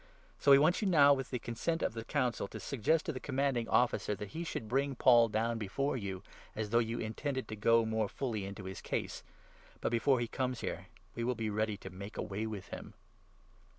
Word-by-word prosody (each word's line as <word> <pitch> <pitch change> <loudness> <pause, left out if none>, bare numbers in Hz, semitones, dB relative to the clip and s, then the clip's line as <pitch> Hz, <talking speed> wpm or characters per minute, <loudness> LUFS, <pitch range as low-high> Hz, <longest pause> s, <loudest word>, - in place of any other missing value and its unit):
So - - +2
we 140 - +10
want 155 +8 +3
you 210 - +1
now, 145 -6 +7
with 135 -1 -3
the 125 - -2
consent 125 +9 -2
of - - 0
the 115 - -5
15 115 - -9
Council, 125 -8 0
to - - -8
suggest 150 - +1
to 160 - -2
the 130 - -5
Commanding 135 -4 0
Officer 120 -3 +2
that 105 0 -7
he 165 - -5
should 115 -9 -4
bring 135 +4 0
Paul 120 -1 +6
down 115 +2 0
before 135 +7 -1
you, 100 -5 -4 0.3
as 105 -1 -3
though 115 - +5
you 115 0 -1
intended 130 +3 -3
to 110 - -4
go 115 +2 +4
more 110 -2 0
fully 115 -7 -3
into 100 +1 -7
his 95 0 -7
case; - - -3 0.6
but, - - -1
before 125 +2 +3
he 120 - -1
comes 130 0 -2
here, - - -4 0.3
we 115 - -3
will 125 +1 0
be 110 -1 -2
ready 110 0 0
to 95 -2 -9
make 100 +3 -8
away 105 +3 -3
with 105 -4 -6
him." - - -8
115 Hz, 220 wpm, -33 LUFS, 110-135 Hz, 0.6 s, we